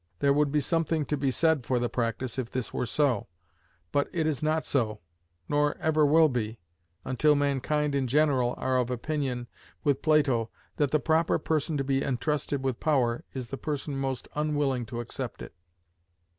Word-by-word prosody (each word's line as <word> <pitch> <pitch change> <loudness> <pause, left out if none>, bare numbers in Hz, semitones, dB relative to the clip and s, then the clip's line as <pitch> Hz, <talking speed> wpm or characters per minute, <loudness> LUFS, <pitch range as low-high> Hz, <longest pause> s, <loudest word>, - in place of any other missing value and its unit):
There 140 +8 +3
would 145 0 +2
be 150 - +2
something 165 0 0
to 150 - -1
be 140 -1 0
said 160 0 +2
for 125 +1 0
the 120 0 +1
practice 120 +2 -2
if 120 -3 -3
this 130 -2 -4
were 125 - -1
so; 140 +1 +1 0.6
but 145 - +1
it 165 -3 0
is 155 -4 -1
not 155 +1 +1
so, 110 -6 0 0.5
nor 145 0 +1
ever 155 -2 +3
will 160 +2 +6
be, 115 -4 -2 0.5
until 150 +4 +3
mankind 145 +1 0
in 135 -2 +1
general 130 -3 +2
are 130 0 0
of 125 -1 +1
opinion, 125 -1 -2 0.4
with 145 -4 +1
Plato, 135 -8 +3 0.3
that 145 -2 +2
the 155 - +2
proper 160 +4 +2
person 155 0 -1
to 135 - 0
be 135 0 +1
intrusted 140 +1 -1
with 130 -3 -1
power 125 -6 +1
is 125 -3 -5
the 135 - -4
person 145 -1 -3
most 135 -1 -3
unwilling 145 -5 0
to 120 +2 -4
accept 110 - -6
it. - - -10
140 Hz, 180 wpm, -28 LUFS, 125-150 Hz, 0.6 s, will